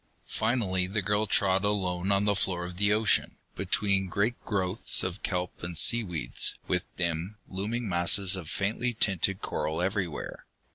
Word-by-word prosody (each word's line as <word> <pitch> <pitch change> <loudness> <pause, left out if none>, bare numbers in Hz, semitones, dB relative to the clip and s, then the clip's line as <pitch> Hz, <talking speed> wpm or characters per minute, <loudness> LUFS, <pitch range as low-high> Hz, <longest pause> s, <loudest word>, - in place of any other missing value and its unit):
Finally 105 -6 0
the 100 +2 -2
girl 105 +2 +1
trod 95 0 +3
alone 95 -2 0
on 100 +1 +2
the 105 - +3
floor 90 -2 +1
of 90 0 -8
the 100 +1 +2
ocean, 110 +1 +2 0.2
between 100 -2 0
great 105 +6 -1
growths 95 0 +1
of 95 +1 -4
kelp 90 -1 -3
and 85 -1 -5
seaweeds, 85 - +2
with 90 -1 0
dim, 85 +4 -2
looming 105 +5 -3
masses 90 +2 +2
of 85 -5 -7
faintly 115 +4 -1
tinted 100 -2 0
coral 80 +1 -2
everywhere. 90 -3 -3
95 Hz, 150 wpm, -28 LUFS, 90-105 Hz, 0.2 s, trod